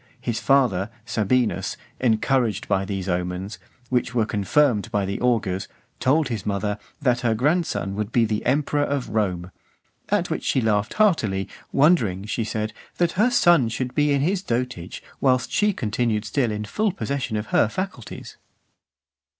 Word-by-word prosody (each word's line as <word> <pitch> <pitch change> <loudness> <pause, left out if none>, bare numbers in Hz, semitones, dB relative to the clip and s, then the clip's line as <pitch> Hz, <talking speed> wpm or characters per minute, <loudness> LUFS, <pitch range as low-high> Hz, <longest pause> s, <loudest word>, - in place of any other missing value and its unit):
His 115 -2 -2
father, 120 -8 +2 0.2
Sabinus, 120 +1 0 0.2
encouraged 115 -3 +1
by 95 0 +1
these 95 -2 -4
omens, 90 +3 -3 0.3
which 125 -1 0
were 115 -3 +3
confirmed 105 +1 +2
by 100 -1 0
the 100 +1 -4
augurs, 100 -6 0 0.3
told 145 +3 +2
his 110 -5 -3
mother, 105 +1 -2 0.2
"that 125 -5 +2
her 120 -3 +1
grandson 145 - 0
would 105 +2 -3
be 110 -3 +1
emperor 145 +3 +1
of 140 -2 -1
Rome;" 95 -5 -1 0.6
at - - +1
which - - -2
she - - +1
laughed 110 -2 0
heartily, 110 - +2 0.2
wondering, 115 - +3
she 110 +2 -2
said, 110 0 -3 0.2
"that 175 -1 +2
her 215 +6 +3
son 175 - +4
should 125 +2 -3
be 150 -1 +2
in 140 -1 +2
his 185 +5 +1
dotage 120 - -3 0.2
whilst 130 -2 +2
she 210 0 +3
continued 110 - -1
still 120 +1 0
in 105 0 -3
full 215 - 0
possession 140 - -3
of 105 +1 -6
her - - +5
faculties." 180 - -6
115 Hz, 155 wpm, -23 LUFS, 105-140 Hz, 0.6 s, her